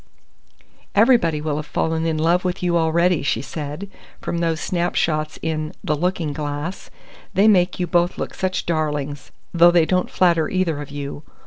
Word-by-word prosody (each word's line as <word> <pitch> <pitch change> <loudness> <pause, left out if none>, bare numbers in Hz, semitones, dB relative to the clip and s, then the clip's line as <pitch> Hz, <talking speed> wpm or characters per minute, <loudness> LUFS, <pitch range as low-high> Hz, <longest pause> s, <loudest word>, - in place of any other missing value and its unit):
"Everybody 200 - +4
will 150 -1 -2
have 150 -1 -5
fallen 160 0 -1
in 160 -1 0
love 170 +3 +2
with 180 0 -2
you 175 -1 +1
already," 170 +1 +2
she 130 -3 -1
said, 150 +6 -6 0.3
"from 170 - -3
those 165 -2 0
snapshots 160 -3 -1
in 155 -1 -2
the 150 - 0
Looking 165 -1 -1
Glass. 145 +5 -5 0.5
They 200 +4 +5
make 185 -4 +3
you 180 - +1
both 175 +1 +1
look - - -4
such 185 0 -2
darlings 150 -3 -2 0.2
though 170 0 +7
they 175 -2 +4
don't 180 +2 0
flatter 170 -4 +2
either 170 -6 0
of 145 - -8
you. 145 0 -6
165 Hz, 165 wpm, -21 LUFS, 155-180 Hz, 0.5 s, though